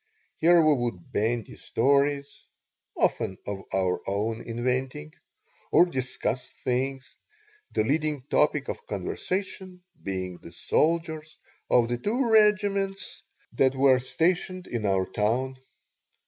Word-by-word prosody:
Here 170 +2 +6
we 155 - +6
would 120 -10 -3
bandy 115 +1 -1
stories 140 +1 +1 0.5
(often 95 - +1
of 100 -1 -4
our 95 -1 0
own 110 +3 -1
inventing) 120 - -2 0.6
or 175 - +7
discuss 130 -4 -3
things, 130 +1 -3 0.6
the - - +1
leading 150 +2 0
topic 140 - +1
of 475 - -6
conversation 185 -1 -4 0.2
being 95 -2 -4
the 85 - -12
soldiers 160 - 0 0.3
of 120 -1 +4
the 120 0 -2
two 235 - 0
regiments 205 -2 +2 0.3
that 135 0 +3
were 130 -1 +5
stationed 180 +6 0
in 110 -4 -2
our 95 -1 +2
town. 120 +7 -1
130 Hz, 115 wpm, -27 LUFS, 115-170 Hz, 0.6 s, or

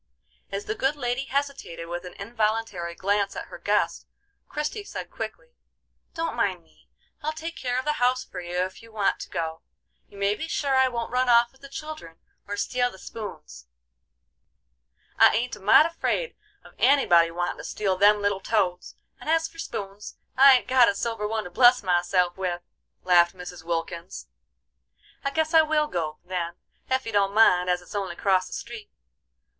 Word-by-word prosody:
As 200 +1 -4
the - - -2
good 270 +5 0
lady 250 -1 -2
hesitated 275 -12 -3
with 175 +1 -5
an 180 - -8
involuntary 215 -5 -2
glance 200 +2 0
at - - -6
her - - -10
guest, - - 0 0.4
Christie 300 +8 -3
said - - -7
quickly: - - -7 0.6
"Don't 330 0 -2
mind 190 -7 0
me; 160 - -28 0.3
I'll 305 0 -1
take 325 +2 -6
care 250 -1 -2
of 260 - -2
the 300 - +1
house 255 +1 +3
for - - -7
you 175 +1 -2
if 185 +1 -7
you 230 0 -15
want 210 -3 0
to - - -8
go. 160 -1 -4 0.5
You 200 - -16
may 200 +1 +2
be 315 +9 -5
sure 280 -4 0
I 260 0 +5
won't 235 -2 -4
run 250 0 +1
off 235 0 +5
with 265 - -26
the 275 - -11
children 305 - -8 0.3
or 205 0 -4
steal 245 +4 0
the 190 - -13
spoons." 65 - -9 1.5
"I - - +7
ain't 245 +4 -1
a - - -14
mite 205 +9 +6
afraid 335 +8 -2 0.3
of - - -16
anybody 175 -12 +5
wantin' 175 +1 -3
to - - -7
steal 195 -3 -1
them 205 +2 +4
little 200 -1 0
toads; 180 -5 -1 0.2
and - - -7
as 325 0 +2
for 330 - -17
spoons, 200 -8 -6 0.2
I 270 0 +8
ain't - - -7
got 255 -2 +6
a 200 - -1
silver 225 0 -2
one 220 0 -2
to 180 - -9
bless 245 +3 +5
myself 180 0 +2
with," 175 -2 -3 0.4
laughed 175 0 +4
Mrs. 180 -2 -9
Wilkins. 170 +1 -4 1.0
"I 275 - 0
guess 315 +3 -1
I 320 - +8
will 310 -1 +2
go, 165 - -3
then, 175 -2 -3 0.3
ef 260 0 0
you 225 - -4
don't 200 -1 +1
mind, 180 -5 +5
as 180 0 0
it's - - -13
only 195 -4 -2
acrost 185 -1 +2
the - - -9
street. 235 -3 -7
210 Hz, 185 wpm, -26 LUFS, 180-260 Hz, 1.5 s, I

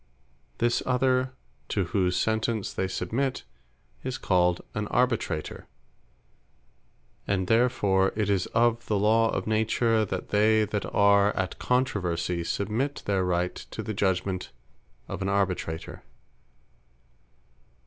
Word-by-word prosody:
This 120 0 +1
other, 130 0 +1 0.4
to 100 - 0
whose 90 0 0
Sentence 110 -1 0
they 95 - -1
submit, 120 +9 -2 0.6
is 130 -1 -3
called 90 -2 +2
an 105 0 -2
ARBITRATOR. 120 -11 -1 1.6
And 95 -2 0
therefore 105 -4 +2
it 105 -2 0
is 100 -3 +1
of 115 0 +2
the 105 - +1
Law 110 +2 +3
of - - -2
Nature, 110 +1 +2
"That 95 -2 -4
they 110 +1 +4
that 105 0 -3
are 100 0 +4
at 95 -1 -3
controversie, 90 -9 0
submit 110 +11 -2
their 100 -2 +1
Right 90 0 0
to - - -8
the 110 - -4
judgement 95 -1 -1 0.6
of - - -6
an 95 - -1
Arbitrator." 95 -5 -2
105 Hz, 120 wpm, -27 LUFS, 95-115 Hz, 1.6 s, they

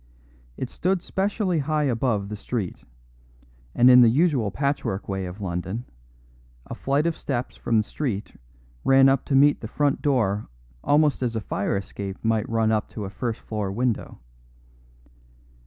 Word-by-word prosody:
It 130 - -4
stood 185 0 0
specially 195 -3 0
high 150 +1 0
above 115 -6 0
the 105 - -4
street, 105 -3 -4 0.9
and 120 - +5
in 125 0 +9
the 120 - +7
usual 135 - +2
patchwork 140 -5 -2
way 95 -1 -3
of 90 +4 -9
London, 95 +5 -4 0.8
a - - -7
flight 140 +3 0
of 170 -1 +1
steps 125 -3 -4
from 115 - 0
the 110 - +3
street 110 -4 -4 0.5
ran 135 0 +6
up 135 -1 +2
to 135 - 0
meet 145 +2 +5
the 110 - -5
front 145 +4 0
door 110 -8 +1 0.4
almost 150 -1 +3
as 120 -2 -1
a - - 0
fire 100 -1 -2
escape 100 0 -6
might 115 -1 +1
run 115 -1 +2
up 110 -1 0
to 105 - -6
a 95 - -6
first 115 +1 -4
floor 105 -3 -3
window. 120 +2 -2
120 Hz, 160 wpm, -24 LUFS, 105-140 Hz, 0.9 s, in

